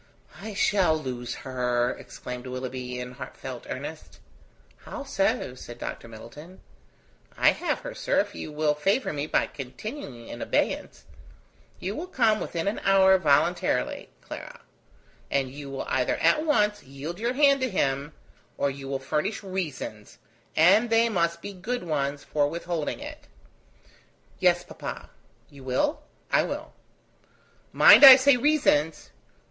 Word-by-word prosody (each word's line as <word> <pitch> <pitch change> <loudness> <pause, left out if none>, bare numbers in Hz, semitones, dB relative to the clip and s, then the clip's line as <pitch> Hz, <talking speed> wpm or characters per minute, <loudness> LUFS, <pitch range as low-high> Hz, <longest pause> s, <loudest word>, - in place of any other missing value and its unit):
"I 215 0 -7
shall 190 -6 +2
lose 125 -4 -5
her," 125 -1 0
exclaimed 125 0 -8
Willoughby, 125 -1 -5
in 125 0 -6
heartfelt 125 - -8
earnest. - - -7 0.6
"How - - -8
so?" 125 - -1
said 120 -2 -10
Dr. 115 - -6
Middleton. 120 +11 -12 0.8
"I - - +5
have - - -2
her, - - -7
sir, - - 0
if - - -1
you 155 - -7
will 150 0 +1
favour 195 - 0
me 145 0 -3
by - - +2
continuing 135 - -8
in - - -8
abeyance. - - -2 0.7
You 195 +3 -4
will 340 +4 -5
come 225 -10 +2
within 165 +1 -3
an 205 - -1
hour 190 -1 +5
voluntarily, 145 -5 +1
Clara; - - -9 0.7
and 135 -2 0
you 140 0 -9
will 135 -1 -5
either 125 -1 +1
at 305 - +3
once 210 -7 +2
yield 140 +7 -8
your 235 +3 -1
hand 280 0 +4
to 260 - 0
him 140 -5 -1 0.4
or 140 - +1
you 135 0 -9
will 135 0 -2
furnish 155 +11 -2
reasons, 155 - -5 0.4
and 200 +9 +5
they 230 +1 +4
must 170 -4 -1
be 205 - -6
good 215 +5 -4
ones, 145 -3 -2
for 145 -1 0
withholding 170 -1 -3
it." - - -9 1.1
"Yes, - - +3
papa." - - -8 0.4
"You 140 -2 -13
will?" 130 - 0 0.3
"I - - +4
will." - - -5 1.0
"Mind, - - +8
I 265 -2 +14
say 270 +1 +5
reasons." 245 - +1
155 Hz, 140 wpm, -26 LUFS, 135-210 Hz, 1.1 s, I